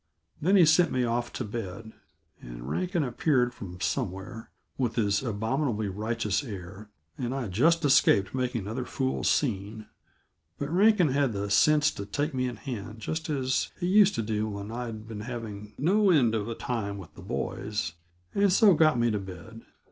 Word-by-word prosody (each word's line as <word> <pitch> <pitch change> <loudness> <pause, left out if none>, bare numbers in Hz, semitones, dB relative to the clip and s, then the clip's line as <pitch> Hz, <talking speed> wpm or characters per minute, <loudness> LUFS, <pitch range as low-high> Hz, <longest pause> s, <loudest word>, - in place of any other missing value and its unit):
Then 185 +6 +3
he 180 -4 +7
sent 160 +2 +4
me 125 - +1
off 120 0 -1
to - - -3
bed, 110 0 -6 0.5
and - - -9
Rankin 180 - -1
appeared 125 -1 +1
from 90 -7 -9
somewhere, 95 +4 -3 0.3
with 125 -4 -1
his 100 -3 +1
abominably 110 -1 -1
righteous 105 +1 -1
air, 100 -2 -8 0.3
and 125 +1 -2
I 130 -4 -3
just 160 - +3
escaped 100 -8 +4
making 125 -2 -1
another 115 +6 -4
fool 130 0 -2
scene. 110 -4 0 0.7
But 140 +1 -4
Rankin 195 -3 +5
had 135 -3 +1
the 100 0 -3
sense 150 +7 +4
to 100 - -7
take 145 +8 -2
me 130 -1 0
in 120 - -4
hand 110 -1 -6
just 160 +8 -4
as 130 -3 0
he 175 - -2
used 200 +2 +5
to 115 - -1
do 110 0 -1
when 100 +1 -6
I'd 115 -2 -6
been 110 -2 -7
having 105 -3 -7
no 195 +7 +3
end 130 -10 +4
of 110 -1 -1
a 115 - -3
time 105 -5 -3
with 95 -5 -11
the - - -12
boys, 105 -6 -3 0.4
and 200 -1 +3
so 200 +1 +6
got 155 -4 +4
me 120 0 +2
to 105 - -1
bed. 95 +4 -10
115 Hz, 180 wpm, -28 LUFS, 105-145 Hz, 0.7 s, he